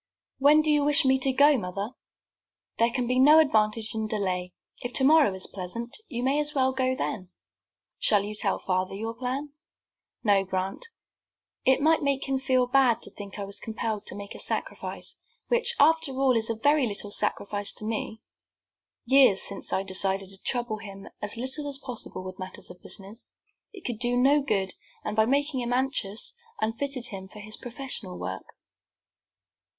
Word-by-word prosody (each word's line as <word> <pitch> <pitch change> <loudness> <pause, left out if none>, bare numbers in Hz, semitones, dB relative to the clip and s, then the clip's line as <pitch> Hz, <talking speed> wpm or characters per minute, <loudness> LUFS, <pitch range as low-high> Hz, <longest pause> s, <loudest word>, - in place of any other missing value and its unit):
"When 295 +3 +6
do 305 - +3
you 295 -1 +3
wish 295 +1 +5
me 265 0 +4
to 265 +1 +3
go, 285 +1 +5
mother?" 195 +4 -4 0.9
"There 230 +1 +4
can 245 +1 -1
be 250 +1 +1
no 295 +4 +8
advantage 220 -7 +2
in 220 -1 -2
delay. 185 -4 -2 0.3
If 245 0 -5
tomorrow 285 -2 +5
is 190 - -1
pleasant, 205 +6 -6
you 240 -4 -4
may 275 +3 +2
as 295 0 -1
well 260 -1 +2
go 260 0 +1
then." 185 -7 -4 0.7
"Shall 205 -2 +4
you 210 +1 -5
tell 210 -2 -1
father 185 0 -1
your 225 +3 -4
plan?" 265 +4 -4 0.7
"No, 200 -4 +4
Grant, 190 - -3 0.8
it 265 +1 +4
might 320 +1 +4
make 280 -1 0
him 270 -1 0
feel 260 -1 +2
bad 255 -2 +3
to - - -4
think 200 -1 -9
I 200 - -3
was 200 0 -5
compelled 220 -2 -4
to - - -2
make 200 0 -7
a - - -9
sacrifice, - - -3 0.3
which, 480 0 +2
after 320 -1 +4
all, 260 -1 +2
is 225 0 +1
very 290 -3 +4
little 205 -1 -1
of - - -3
a - - +4
sacrifice 205 0 0
to 215 - -6
me. 220 0 -3 0.8
Years 260 -6 +5
since 200 - -3
I 190 - 0
decided 190 0 0
to 195 0 -9
trouble 240 -3 -1
him 195 -2 -9
as 210 +2 -2
little 265 +4 0
as 275 - -1
possible 250 -8 -5
with 185 +1 -8
matters 185 -1 -7
of 180 - -15
business. 200 +4 -7 0.4
It 390 -5 -13
could 235 -3 -3
do 245 0 +1
no 280 +4 +4
good, 195 -8 0 0.3
and, - - -2
by 220 0 +3
making 285 +1 +1
him 240 -1 -2
anxious, 260 - -1 0.3
unfitted 245 +3 -2
him 190 -2 -7
for 210 - -13
his 215 +1 -5
professional 240 -7 -5
work." 95 0 -6
235 Hz, 180 wpm, -27 LUFS, 200-270 Hz, 0.9 s, no